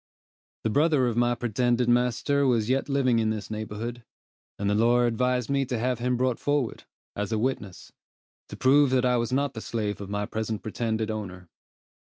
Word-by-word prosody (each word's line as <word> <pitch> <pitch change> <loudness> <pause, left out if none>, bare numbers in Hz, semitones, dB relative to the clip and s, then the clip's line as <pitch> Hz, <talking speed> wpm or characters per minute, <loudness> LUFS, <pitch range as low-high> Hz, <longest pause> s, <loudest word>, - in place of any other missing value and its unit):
The 110 - 0
brother 145 0 +3
of 120 -2 0
my 120 0 +2
pretended 120 +1 0
master 125 +4 +2
was 115 -3 +1
yet 135 +2 0
living 130 -4 +2
in 110 -1 +1
this 110 -1 -4
neighborhood, 110 +3 -5 0.5
and 100 - -2
the 100 - +2
lawyer 120 +3 +3
advised 125 +1 0
me 140 -1 +1
to 125 -2 -2
have 125 +1 -1
him 125 +1 0
brought 125 -1 0
forward, 145 -5 -1 0.3
as 105 +1 -3
a 110 - +1
witness, 105 -5 -3 0.6
to - - -8
prove 140 +2 +5
that 130 0 +2
I 125 -1 +3
was 120 +1 -1
not 140 +1 0
the 110 - -6
slave 105 -3 -3
of 100 - -7
my 105 0 -2
present 110 0 -4
pretended 110 0 -2
owner. 90 -5 -7
120 Hz, 190 wpm, -26 LUFS, 110-130 Hz, 0.6 s, prove